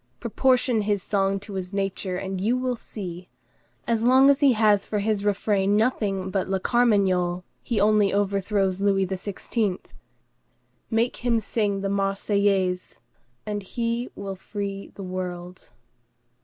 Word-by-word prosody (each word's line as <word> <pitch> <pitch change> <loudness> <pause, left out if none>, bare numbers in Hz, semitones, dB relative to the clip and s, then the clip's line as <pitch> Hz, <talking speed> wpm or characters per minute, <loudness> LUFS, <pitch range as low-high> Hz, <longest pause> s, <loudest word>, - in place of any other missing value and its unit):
Proportion 245 0 +2
his 205 -2 0
song 195 -1 0
to 205 0 -9
his 190 0 -5
nature, 195 -2 -2
and 190 0 -4
you 230 +5 +2
will 255 -1 -1
see! 180 -6 -8 0.6
As 230 -2 0
long 260 +3 +6
as 280 - +1
he 280 -3 +5
has 210 -3 +3
for - - -4
refrain 205 -1 +1
nothing 200 -5 0
but 190 -1 -1
la 190 - +1
Carmagnole, 190 -6 +2 0.2
he 235 -4 -1
only 210 -1 +4
overthrows 200 -1 0
Louis 195 -1 +2
XVI.; 195 +1 -2 1.1
make 230 +1 +1
him 240 -2 +1
sing 205 -2 -1
the 195 - -1
Marseillaise, 195 -1 0 0.5
and 210 -1 -3
he 235 +4 -2
will 195 -1 -5
free 200 0 -6
the 200 - -7
world. 180 -1 -6
200 Hz, 135 wpm, -25 LUFS, 190-220 Hz, 1.1 s, long